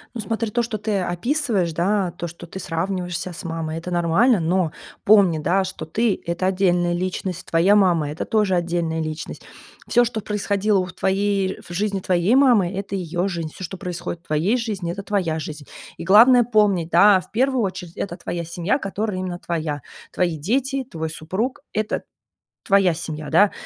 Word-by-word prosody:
Ну, 225 - -3
смотри, 225 0 -2
то, 240 - +1
что 230 -2 -3
ты 205 -1 -1
описываешь, 190 - 0
да, 185 +2 +1
то, 175 0 -6
что 170 +1 -10
ты 190 +3 -8
сравниваешь 180 +1 -2
ся 180 0 -5
с - - -8
мамой, 165 -1 -4
это 170 - -7
нормально. 180 +7 +3
Но 170 0 +1 0.3
помни, 195 -6 +5
да, 185 +5 +2
что 190 -4 -6
ты- 210 +6 0
это 170 +2 -1
отдельная 180 -2 +2
личность, 185 0 -3
твоя 175 +5 +4
мама- 175 -7 +3
это 155 - -4
тоже 210 -4 +1
отдельная 170 -2 -1
личность. 155 0 -5 0.5
Всё, 240 0 +4
что 225 -2 -3
происходило 205 -1 0
в 180 - -10
твоей, 195 0 0
в 175 - -8
жизни 200 +2 -1
твоей 185 +4 +2
мамы, 240 -10 +4
это 200 0 -4
её 175 +1 -2
жизнь. 170 -4 -3
Всё, 190 - -8
что 185 +2 -6
происходит 175 -2 -5
в - - -27
твоей 160 +9 +1
жизни, 205 -7 -3
это 200 +3 -5
твоя 185 -6 -1
жизнь. 150 -1 -7 0.3
И - - -6
главное 235 +7 +7
помнить, 210 -7 +2
да, 195 +3 +6
в - - -14
первую 255 +1 +1
очередь, 180 -3 -5
это 175 -3 -3
твоя 170 -1 -4
семья, 170 - -1
которая 205 -3 -3
именно 180 -1 -4
твоя, 155 -4 -3 0.3
твои 175 -3 0
дети, 265 - -1
твой 160 -9 -5
супруг, 190 +11 -3
это 215 0 -1 0.6
твоя 195 -3 +4
семья, 155 -2 -6
да. 205 0 +5
185 Hz, 185 wpm, -22 LUFS, 170-210 Hz, 0.6 s, главное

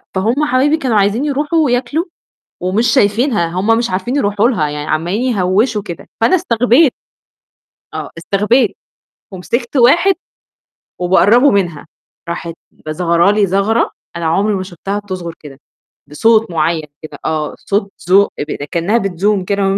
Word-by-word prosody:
فهُم 230 +10 +1
حبايبي 285 +3 +2
كانوا 255 -8 0
عايزين 205 +7 +1
يروحوا 295 +3 0
وياكلوا 255 +6 0 0.6
ومش 190 +6 0
شايفينها، 215 -4 +2
هم 200 +7 +1
مش 235 - -1
عارفين 190 +8 -2
يروحوا 205 -3 +2
لها، 165 - 0
يعني 150 0 -5
عَمّالين 175 +8 -1
يهوّشوا 205 +4 +1
كده، 175 -5 -9
فأنا 230 +11 +3
استغبيت. 250 -2 +3 1.0
آه، - - -5
استغبيت 210 +6 +1 0.6
ومسكت 235 +8 -3
واحد 340 +11 +4 0.8
وباقرّبه 205 +9 +4
منها، 175 -8 -1 0.4
راحت 170 0 -5 0.2
ب 155 - -9
ظَغرة 170 +3 +2
لي 205 -1 +2
ظَغرة 200 +5 +1 0.2
أنا 170 -1 -4
عمري 195 +6 +1
ما 190 - -3
شُفتها 195 +2 -5
بتظغر 185 -4 -6
كده، 140 -3 -12 0.5
بصوت 220 +7 +2
معيّن 160 -1 -1
كده 155 - -9
آه، 155 -1 -2
صوت 200 0 -2
زو 190 +3 +3
اب 145 - -3 0.2
كإنّها 175 +7 +1
بتزوم 195 -1 0
كده 195 0 0
200 Hz, 140 wpm, -15 LUFS, 175-240 Hz, 1.0 s, واحد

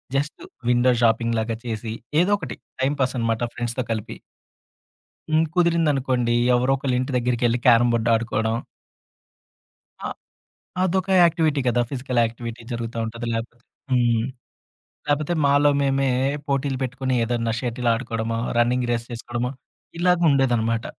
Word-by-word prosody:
Just 145 +2 -2 0.3
window 125 +1 +4
shopping 115 0 +2
లాగా 110 0 -2
చేసి 110 -1 -4 0.3
ఏదో 195 +3 +1
ఒకటి 160 - -6 0.3
టైమ్‌పాస్ 130 -1 0
అనమాట 115 0 0
ఫ్రెండ్స్‌తో 120 +1 -2
కలిపి. 110 0 -4 1.1
హ్మ్, 160 +1 +4
కుదిరింది 170 -3 +3
అనుకోండి 125 -3 0 0.2
ఎవరో 125 +2 +3
ఒకళ్ళింటి 130 -1 -1
దగ్గరికి 120 0 0
ఎళ్లి 120 +1 0
క్యారమ్ 120 0 +6
బోర్డ్ 115 0 +1
ఆడుకోడం. 115 0 0 1.5
ఆ! - - -1 0.8
అదొక 190 +1 0
యాక్టివిటీ 160 -4 +3
గదా 120 0 +2
ఫిజికల్ 125 -2 -1
యాక్టివిటీ 115 +1 -6
జరుగుతా 115 0 -4
ఉంటది 115 +1 -6
లేపోతే 120 +1 -6 0.3
హ్మ్. 120 -2 +2 0.8
లేపోతే 150 +4 +1
మాలో 145 +1 +4
మేమే 135 -1 +1 0.4
పోటీలు 140 -1 0
పెట్టుకొని 130 0 -2
ఏదన్నా 115 -1 -1
షటిల్ 120 0 -2
ఆడుకోవడమో 115 -1 -3 0.2
రన్నింగ్ 125 +1 +2
రేస్ 115 0 -2
చేసుకోవడమో 120 +1 -3 0.5
ఇలాగ 180 0 +4
ఉండేదన్నమాట. 120 -4 +1
120 Hz, 125 wpm, -23 LUFS, 115-135 Hz, 1.5 s, క్యారమ్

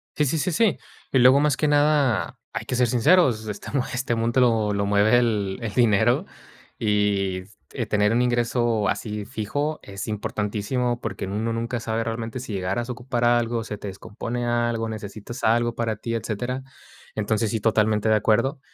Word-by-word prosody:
Sí, 150 - +2
sí, 145 +4 0
sí, 180 +4 0
sí. 175 - +2 0.4
Y 135 - +5
luego, 130 +3 +7
más 145 -2 +2
que 155 - 0
nada, 145 -5 +2
hay - - -5
que - - -2
ser 125 0 +3
sinceros, 125 -2 +3
este, 105 -1 -6
mo 135 -3 +1
este 125 -1 -1
mundo 115 +3 +1
lo 110 -4 +2
lo 100 0 0
mueve 100 +3 +4
el 105 -5 0
el 110 -3 -4
dinero. 120 - +3 0.5
Y 100 -4 +1 0.5
tener 105 0 +2
un 120 +2 +2
ingreso 120 -3 +1
así, 105 +1 -3
fijo, 140 +7 -3
es 100 -1 -7
importantísimo, 110 +3 -2
porque 105 -5 -4
en 95 - -6
uno 110 +3 -1
nunca 115 +1 -2
sabe 115 0 -2
realmente 115 +1 -4
si 125 - -7
llegaras 95 +6 -2
a - - -1
ocupar 120 0 -3
algo, 120 -1 +2
se 105 -1 -6
te 105 - -7
descompone 115 +5 -5
algo, 120 -1 0
necesitas 110 +2 -7
algo 120 +1 +2
para 115 -2 -1
ti, 115 +2 -4
etcétera. 120 +4 -3 0.5
Entonces, 110 +1 0
sí, 110 -2 -2
totalmente 110 0 +2
de 110 - +5
acuerdo. 110 +7 +2
115 Hz, 180 wpm, -24 LUFS, 105-125 Hz, 0.5 s, luego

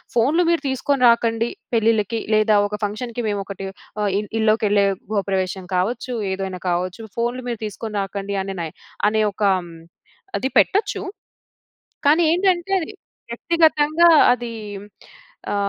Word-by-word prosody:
ఫోన్‌లు 290 +10 +3
మీరు 335 -3 0
తీసుకొని 265 0 0
రాకండి, 230 0 +2 0.3
పెళ్ళిళ్ళకి 225 0 +1
లేదా 215 0 +4
ఒక 210 0 -5
ఫంక్షన్‌‌కి 235 +3 -4
మేము 205 -1 -1
ఒకటి 195 0 -6 0.4
ఆహ్, 205 - +1
ఇల్ 210 - -6
ఇల్లోకెళ్ళే 210 -2 +3 0.2
గృహప్రవేశం 190 -2 -1
కావచ్చు. 240 +7 -1 0.2
ఏదైనా 190 -1 -4
కావచ్చు. 180 +4 -2
ఫోన్‌లు 240 +2 -1
మీరు 230 -2 -4
తీసుకొని 210 +1 -7
రాకండి 200 +1 -4
అనే 195 0 -5
నై 165 - -3 0.4
అనే 215 0 +1
ఒక 210 - -4 0.2
హ్మ్, 170 -2 -10 0.6
అది 265 - -1
పెట్టొచ్చు. 410 +3 +1 1.0
కానీ, 310 +4 +5
ఏంటంటే 365 +1 +1 0.6
వ్యక్తిగతంగా 320 +4 +3 0.2
అది 240 -1 -3 1.0
ఆ - - 0
225 Hz, 125 wpm, -21 LUFS, 200-255 Hz, 1.0 s, కానీ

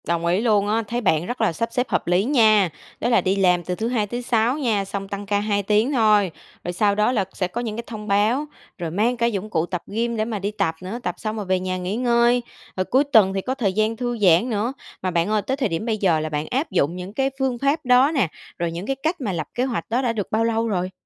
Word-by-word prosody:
Đồng 170 0 0
ý 175 +4 +2
luôn 210 -4 +2
á, 225 +2 +1
thấy 240 +2 -2
bạn 165 -6 +2
rất 245 +5 -4
là 215 -6 +2
sắp 230 +8 -2
xếp 250 +1 0
hợp - - -1
lý 180 +2 +3
nha. 215 -7 +4 0.3
Đó 240 - 0
là 235 - +4
đi 190 0 +1
làm 180 -3 +3
từ 180 +2 -3
thứ 220 +5 -2
Hai 230 -4 0
thứ 240 +4 -4
Sáu 240 +2 +1
nha, 220 -9 0
xong 195 0 -5
tăng 200 0 -5
ca 200 0 +1
2 205 -1 0
tiếng 215 +6 +2
thôi, 215 - +3 0.3
rồi 175 - -3
sau 200 +2 +2
đó 210 +3 +2
là 210 -6 +1
sẽ 185 - -1
có 230 +7 -4
những 220 -3 -4
cái 235 - -5
thông 215 -2 -7
báo, 215 +8 +2 0.3
rồi 170 -3 -4
mang 225 +7 +1
cả 235 - +1
dụng 215 -3 -2
cụ 165 -4 0
tập 175 -1 -4
gym 235 +3 -1
để 215 - 0
mà 220 -2 -3
đi 200 +2 -2
tập 165 -6 -1
nữa, 190 +6 -5
tập - - -2
xong 215 -1 -4
rồi 210 -2 -4
về 185 0 +1
nhà 185 0 -2
nghỉ 180 +2 -3
ngơi, 240 0 +3 0.4
rồi 185 - 0
cuối 265 +7 +3
tuần 220 -10 +4
thì 195 - -1
có 255 +6 -3
thời 205 -7 0
gian 215 +2 +1
thư 240 0 -2
giãn 190 +2 +4
nữa. 225 +3 -1 0.3
Mà 185 - -1
bạn 170 +2 +1
ơi 215 -1 +2
tới 265 +6 -2
thời 270 - 0
điểm 165 +6 -3
bây 225 -2 0
giờ 180 -6 +2
là 155 0 -3
bạn 150 0 -3
áp 270 +6 -1
dụng 150 +5 +1
những 180 +2 -7
cái 270 +3 +1
phương 265 -2 0
pháp 280 +4 0
đó 250 +3 +5
nè, 235 - +3 0.3
rồi 170 -1 -1
những 170 +3 -5
cái 270 - 0
cách 315 +5 -2
mà 215 -6 -1
lập 155 -4 -3
kế 245 - +1
hoạch 250 -4 -3
đó 240 +3 +1
đã 240 -3 0
được 205 -4 -4
bao 220 +1 +2
lâu 230 0 0
rồi? 185 -3 -1
215 Hz, 285 wpm, -22 LUFS, 185-240 Hz, 0.4 s, đó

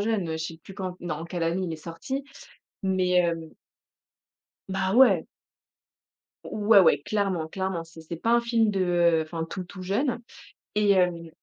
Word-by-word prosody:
jeune, 210 -5 0
heu, - - -1
je 160 0 -3
sais 165 0 -6
plus 190 +4 -13
quand 185 -2 -5
en 165 - -3
quelle 170 0 -4
année 170 +3 0
il 170 - -3
est - - -4
sorti, 170 - -5 0.6
mais 185 -2 +2
heu 165 -1 -7 1.2
Bah, 190 0 -1
ouais! 260 +1 +6 1.2
Ouais, 210 0 +4
ouais, 160 -6 +5
clairement, 190 -3 -1
clairement. 190 0 -3
C'est 165 0 -13
c'est 160 +1 -7
pas 225 +8 0
un 235 - +4
film 230 -2 +2
de 175 -4 +3
enfin, 160 0 -4
tout, 185 - -4
tout 185 +1 -10
jeune 225 +8 0 0.6
et 210 -1 +4
hem 180 -3 +2
185 Hz, 170 wpm, -26 LUFS, 165-200 Hz, 1.2 s, ouais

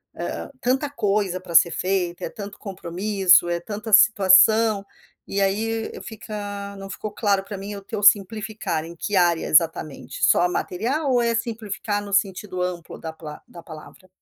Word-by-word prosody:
hã - - -5 0.2
hã, - - -12
tanta 265 +4 +1
coisa 205 -8 -1
para 175 -2 -8
ser 170 +1 +6
feita, 180 -2 -2
é - - -5
tanto 205 -1 -9
compromisso, 185 -1 +2
é 170 0 -1
tanta 210 +5 -7
situação, 215 0 +5 0.4
e 200 - -1
aí 220 +3 -1
fica, 205 -2 -7
não 195 0 -8
ficou 210 +2 -6
claro 200 -2 0
para 200 0 -7
mim 200 +2 -7
o 200 - -8
teu 200 +1 -6
simplificar. 210 -4 +2
Em 170 +1 -10
que 205 +4 -3
área, 175 -3 +2
exatamente, 155 -2 0
só 175 - +4
material 245 - -2
ou 250 - +3
é 235 -1 +1
simplificar 220 -3 -3
no 200 - -8
sentido 190 -1 -1
amplo 180 -2 -5
da 160 - -6
pala 155 -2 -10
da 170 - -13
palavra? 160 +4 -13
200 Hz, 170 wpm, -23 LUFS, 180-215 Hz, 0.4 s, ser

